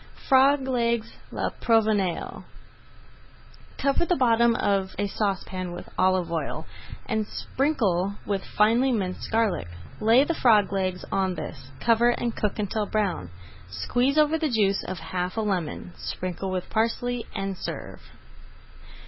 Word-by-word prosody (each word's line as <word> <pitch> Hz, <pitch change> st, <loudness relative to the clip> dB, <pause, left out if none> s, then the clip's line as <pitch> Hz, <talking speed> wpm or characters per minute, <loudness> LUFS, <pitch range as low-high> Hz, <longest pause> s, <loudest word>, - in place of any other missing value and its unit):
FROG 270 Hz, 0 st, +5 dB
LEGS 235 Hz, -3 st, 0 dB, 0.2 s
À -, -, -4 dB
LA -, -, +1 dB
PROVENÇALE 215 Hz, -6 st, +1 dB, 1.3 s
Cover 275 Hz, +4 st, +2 dB
the 355 Hz, -, +3 dB
bottom 235 Hz, -3 st, +4 dB
of 195 Hz, -3 st, 0 dB
a 205 Hz, -, 0 dB
saucepan 190 Hz, -3 st, -2 dB
with -, -, -8 dB
olive 185 Hz, -2 st, +2 dB
oil, 165 Hz, -2 st, -3 dB, 0.4 s
and 220 Hz, -3 st, -1 dB
sprinkle 200 Hz, -, 0 dB
with 195 Hz, -2 st, -1 dB
finely 230 Hz, +5 st, +3 dB
minced 190 Hz, -6 st, -2 dB
garlic. 220 Hz, -, +1 dB, 0.3 s
Lay 230 Hz, +5 st, +5 dB
the 335 Hz, -, 0 dB
frog 215 Hz, -, +4 dB
legs 185 Hz, -2 st, -1 dB
on 190 Hz, -2 st, +1 dB
this, -, -, -7 dB
cover 235 Hz, 0 st, +4 dB
and 240 Hz, -1 st, -1 dB
cook 210 Hz, 0 st, -1 dB
until 210 Hz, 0 st, -1 dB
brown. 195 Hz, -, -1 dB, 0.4 s
Squeeze 245 Hz, -, 0 dB
over 305 Hz, +1 st, +4 dB
the 310 Hz, -2 st, 0 dB
juice 205 Hz, -5 st, +2 dB
of 185 Hz, -, -4 dB
half 180 Hz, +3 st, -4 dB
a -, -, +2 dB
lemon, 180 Hz, -4 st, -2 dB
sprinkle 185 Hz, +1 st, -4 dB
with 185 Hz, -1 st, -3 dB
parsley, 230 Hz, +2 st, 0 dB
and 195 Hz, 0 st, -2 dB
serve. -, -, -6 dB
210 Hz, 140 wpm, -26 LUFS, 185-240 Hz, 1.3 s, FROG